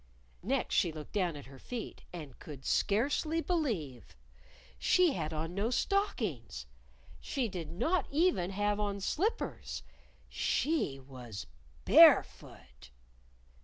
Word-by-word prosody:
Next 260 +7 -1
she 175 -6 +3
looked 155 -1 -9
down 180 -6 0
at 145 - -9
her 135 0 -13
feet 240 - -6
and 150 -7 -9
could 140 -4 -10
scarcely 285 +9 +1
believe! 215 - -2 0.6
She 360 -5 +4
had 155 -2 -3
on 160 +2 -3
no 200 +4 0
stockings! 220 - -1 0.5
She 260 -4 -2
did 170 -6 -6
not 290 - 0
even 290 - +2
have 205 +1 0
on 200 -1 -1
slippers. 365 - -2 0.5
_She 285 - 0
was 125 -6 -9 0.4
barefoot! 65 -1 +4
195 Hz, 115 wpm, -32 LUFS, -, 0.6 s, She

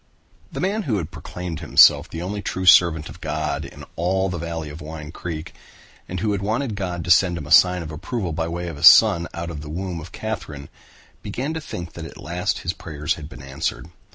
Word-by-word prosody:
The - - -6
man 200 +4 0
who 110 - +2
had 80 -6 -4
proclaimed 90 -2 -6
himself 80 - +6
the 85 +1 -5
only 100 +3 -4
true 95 -1 -3
servant 80 -3 +6
of 90 - -12
God 75 -1 -2
in - - -10
all 95 +3 0
the 90 -2 -4
valley 80 -2 -4
of 75 +3 -10
Wine 75 0 -8
Creek, 85 -2 -6 0.6
and 90 0 -4
who 110 0 +1
had 100 -1 -1
wanted 110 +4 -1
God 90 -4 -3
to 90 - 0
send 90 0 +5
him 75 - -6
a 75 - -10
sign 90 +2 +6
of 80 - -7
approval 90 +3 -4
by 80 +1 -1
way 85 +1 -4
of 80 -4 -6
a - - -8
son 95 -2 +8
out 85 0 -5
of 75 -3 -6
the 75 - -9
womb 90 +1 -4
of 85 +4 -11
Katherine, 80 -11 -6 0.5
began 125 +9 -3
to 160 - -4
think 85 - -7
that 85 - -7
at - - -10
last 90 +2 -2
his 85 - 0
prayers 75 -2 -3
had 75 -1 -9
been - - -11
answered. 70 +4 -4
85 Hz, 225 wpm, -22 LUFS, 80-95 Hz, 0.6 s, son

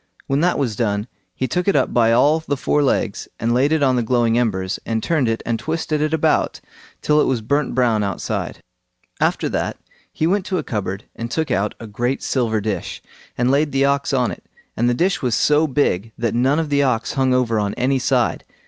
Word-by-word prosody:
When 135 +1 0
that 180 +3 +2
was 125 -7 -1
done, 105 -2 -1 0.3
he 130 - -1
took 180 - -1
it 200 - +3
up 135 - +1
by 115 -2 +4
all 145 +7 +4
the 145 -3 -3
four 150 +3 +1
legs, 120 -6 0
and 115 +2 0
laid 135 +4 +2
it 160 -2 +2
on 130 -2 +3
the - - +2
glowing 115 -1 +1
embers, 95 -6 0
and 110 -1 -2
turned 155 -7 +1
it 115 - -2
and 115 -1 -1
twisted 155 -1 -2
it 155 0 0
about 160 -1 +1 0.4
till 150 0 +3
it - - +2
was 125 -4 0
burnt 140 +5 0
brown 120 -4 +2
outside. 100 -3 -3 0.6
After - - +1
that, - - -2 0.3
he 155 - -1
went 190 +3 +1
to 185 - -1
a 155 - -2
cupboard 100 -4 -4
and 115 0 -5
took 160 +5 -2
out 100 +2 0
a 115 - -8
great 120 +5 -2
silver 115 -4 0
dish, 100 -4 -4 0.3
and 125 +1 +2
laid 145 +2 +2
the 135 0 +2
ox 140 0 +1
on 125 -3 +1
it; - - -9 0.3
and 120 +2 +1
the 120 - +1
dish 185 +8 +1
was 125 -3 +1
so 150 +1 +3
big 115 -7 0
that 115 -2 -1
none 130 +5 +2
of 160 -2 -1
the 140 0 +2
ox 125 -5 0
hung 130 -1 +1
over 120 -3 +2
on 100 -1 -1
any 130 +2 +1
side. - - +1
125 Hz, 220 wpm, -20 LUFS, 115-145 Hz, 0.6 s, by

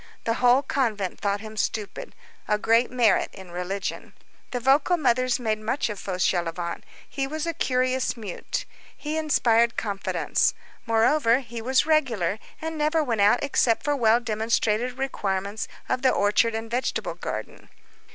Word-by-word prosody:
The 230 - 0
whole 250 +2 +5
convent 215 -11 -1
thought 200 0 -1
him 220 0 -9
stupid. 210 -1 -3 0.3
A 210 - +2
great 230 +3 +3
merit 245 -3 +3
in 190 -3 -11
religion. 180 +3 -4 0.4
The 245 - -3
vocal 275 +8 +3
mothers 255 -3 +2
made 220 -3 -1
much 230 +4 -1
of 205 -2 -5
Fauchelevent. 175 -2 -1 0.3
He 270 -1 -3
was 310 +2 -3
a 335 - -1
curious 255 -4 0
mute. 205 -6 -5 0.3
He 305 +1 -4
inspired 235 -7 +2
confidence. 200 -3 0 0.3
Moreover, 230 +2 +3
he 235 -2 -7
was 260 +4 +2
regular, 230 - +1 0.2
and 320 0 -5
never 310 +1 +2
went 230 -7 0
out 210 +6 +4
except 250 -4 +2
for 290 0 +1
well 230 -3 +4
demonstrated 230 +1 0
requirements 200 -6 -2 0.2
of 255 - -1
the 260 - +4
orchard 220 +2 +2
and 225 0 -5
vegetable 250 +2 -1
garden. - - -7
230 Hz, 150 wpm, -25 LUFS, 210-265 Hz, 0.4 s, whole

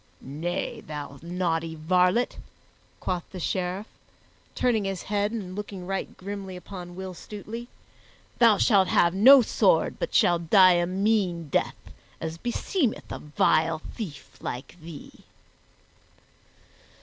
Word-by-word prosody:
"Nay, 155 +6 -4
thou 145 -2 -7
naughty 165 -1 -2
varlet," 180 +8 +2 0.6
quoth 180 -2 -2
the 185 - -8
Sheriff, 185 +3 -2 0.7
turning 225 -5 +1
his 195 -2 -3
head 205 0 0
and 195 -5 -5
looking 200 -3 -6
right 195 +1 -4
grimly 195 -1 -6
upon 180 -1 -9
Will 190 0 -6
Stutely, 215 +6 -8 0.7
"thou 230 -4 +6
shalt 195 -4 +4
have 170 0 +3
no 255 +7 +8
sword - - +2
but - - -3
shall 175 -1 +4
die 185 +3 +6
a 175 0 +1
mean 185 -4 0
death, - - 0 0.4
as 160 +1 -5
beseemeth 245 - -1
a - - -5
vile 155 +1 +1
thief 165 - -8
like 125 +6 -6
thee." 160 -2 -10
185 Hz, 125 wpm, -26 LUFS, 170-205 Hz, 0.7 s, no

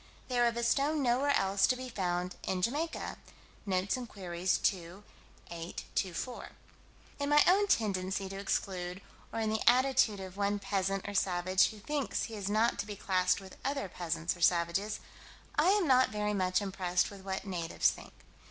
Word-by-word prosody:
"They 250 -1 0
are 240 - +5
of 235 0 -1
a 235 - -1
stone 280 +5 +2
nowhere 255 +3 +2
else 195 0 +2
to 255 - +2
be 255 0 -6
found 180 -5 -2
in 185 -1 -2
Jamaica." 300 - -2 0.5
(Notes 185 0 +1
and 250 -2 -6
Queries, 180 -2 -1
2 185 +1 -2 0.5
8 170 0 -6
24.) 195 +7 -3 0.7
In 285 0 -1
my 295 0 +6
own 400 +3 +5
tendency 190 - 0
to 195 +1 -6
exclude, 185 -2 -2 0.3
or 225 - -3
in 220 -1 0
the 220 - -1
attitude 250 -4 +3
of 190 0 -8
one 205 0 +1
peasant 195 -1 -1
or 205 - -4
savage 185 -1 +2
who 215 - -10
thinks 285 +6 -2
he 225 - -5
is 200 -2 -3
not 220 +3 +2
to - - -2
be 205 - -5
classed 185 -1 +1
with 190 -1 -12
other 275 -5 -1
peasants 170 -1 -2
or 175 - -13
savages, 175 +5 +2 0.5
I - - +3
am 400 -2 +3
not 255 -1 +5
very 210 0 -1
much 185 0 +1
impressed 180 -2 0
with 200 -1 -10
what 190 0 -4
natives 175 -4 +1
think. - - -12
195 Hz, 180 wpm, -32 LUFS, 185-235 Hz, 0.7 s, my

